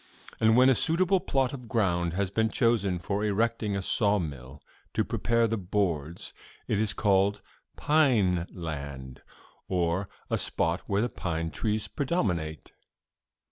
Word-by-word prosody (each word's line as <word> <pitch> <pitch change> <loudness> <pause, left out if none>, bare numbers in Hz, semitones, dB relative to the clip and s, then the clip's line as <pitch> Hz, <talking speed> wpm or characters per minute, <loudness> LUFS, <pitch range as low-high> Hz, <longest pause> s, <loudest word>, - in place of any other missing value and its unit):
And 110 +1 +4
when 130 +1 +7
a 135 - +6
suitable 180 - +3
plot 135 -5 0
of 125 -4 -8
ground 85 -7 0
has 95 0 -1
been 110 +2 +1
chosen 110 -6 +1
for 100 +4 -2
erecting 105 0 0
a 100 - -2
saw 105 +1 +2
mill,' 70 -8 -6 0.4
to - - +2
prepare 115 0 +1
the 115 -1 -1
boards, 85 -5 -2 0.3
'it 105 - 0
is 110 -1 +1
called 100 0 +2 0.4
"pine 110 - +3
land," 70 -6 -7 0.5
or 90 +1 0 0.2
a - - -1
spot 85 +2 0
where 100 +2 +1
the 120 - -1
pine 80 -4 -3
trees 110 -1 -1
predominate. 90 - -2
100 Hz, 140 wpm, -28 LUFS, 85-115 Hz, 0.5 s, when